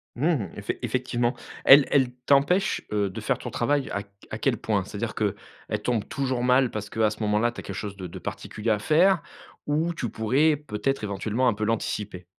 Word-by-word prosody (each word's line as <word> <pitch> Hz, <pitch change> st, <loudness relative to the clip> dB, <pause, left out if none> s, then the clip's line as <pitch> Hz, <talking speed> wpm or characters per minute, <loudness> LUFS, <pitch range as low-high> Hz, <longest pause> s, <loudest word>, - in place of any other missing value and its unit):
Mmh, 140 Hz, -, 0 dB
effec 105 Hz, 0 st, -3 dB
effectivement. 120 Hz, 0 st, 0 dB, 0.3 s
Elle 140 Hz, 0 st, +9 dB
elle 130 Hz, -3 st, +3 dB, 0.2 s
t'empêche, 160 Hz, +9 st, +3 dB
heu, 105 Hz, -2 st, +1 dB
de 105 Hz, -, -7 dB
faire 110 Hz, -, -1 dB
ton -, -, -6 dB
travail 140 Hz, +3 st, 0 dB
à 100 Hz, 0 st, -3 dB
q 100 Hz, -, -28 dB, 0.2 s
à -, -, -4 dB
quel -, -, +1 dB
point? -, -, 0 dB
C'est-à-dire -, -, -5 dB
qu'elle -, -, 0 dB, 0.5 s
tombe 115 Hz, -3 st, 0 dB
toujours 130 Hz, -3 st, -1 dB
mal 125 Hz, 0 st, +4 dB
parce 105 Hz, -1 st, -5 dB
qu'à 110 Hz, -1 st, +2 dB
ce 105 Hz, +1 st, -8 dB
moment-là, 105 Hz, +3 st, +2 dB
tu -, -, -10 dB
as -, -, -7 dB
quelque 100 Hz, -, -6 dB
chose 100 Hz, 0 st, -5 dB
de 95 Hz, -, -6 dB
de 85 Hz, -, -9 dB
particulier 105 Hz, +2 st, -5 dB
à 105 Hz, -2 st, +2 dB
faire 165 Hz, -, +3 dB, 0.4 s
ou 155 Hz, +3 st, 0 dB
tu 120 Hz, -8 st, -3 dB
pourrais 135 Hz, +8 st, +2 dB
peut-être 135 Hz, -3 st, -3 dB
éventuellement 105 Hz, +5 st, 0 dB
un 120 Hz, -, +4 dB
peu 110 Hz, -, -4 dB
l'anticiper? 105 Hz, -4 st, -2 dB
120 Hz, 205 wpm, -26 LUFS, 105-140 Hz, 0.5 s, Elle